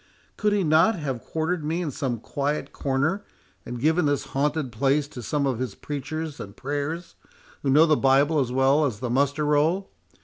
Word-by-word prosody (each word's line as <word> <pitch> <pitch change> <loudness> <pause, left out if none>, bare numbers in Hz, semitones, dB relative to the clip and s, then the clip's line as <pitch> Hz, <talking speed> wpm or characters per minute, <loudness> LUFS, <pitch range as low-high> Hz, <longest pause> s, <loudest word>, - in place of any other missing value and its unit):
Could 210 -1 +1
he 205 -2 +2
not 160 +7 +4
have 135 -8 -4
quartered 160 +1 -2
me 160 +3 -1
in 155 - -3
some 125 -3 -2
quiet 145 +5 -3
corner, 140 +9 0 0.4
and 120 0 -5
given 160 +4 +2
this 145 -1 +1
haunted 145 -1 0
place 140 +5 +1
to 125 - -8
some 140 +5 -1
of 130 -4 -1
his 125 -6 -3
preachers 150 +2 -5
and 100 0 -9
prayers, 145 +5 -3 0.5
who 140 - -1
know 150 +4 +6
the 155 -2 +4
Bible 140 +3 +3
as 130 -3 0
well 135 +4 +3
as 115 -7 -2
the 125 -1 -3
muster 140 +3 +1
roll? 155 +6 +1
145 Hz, 190 wpm, -25 LUFS, 135-155 Hz, 0.5 s, know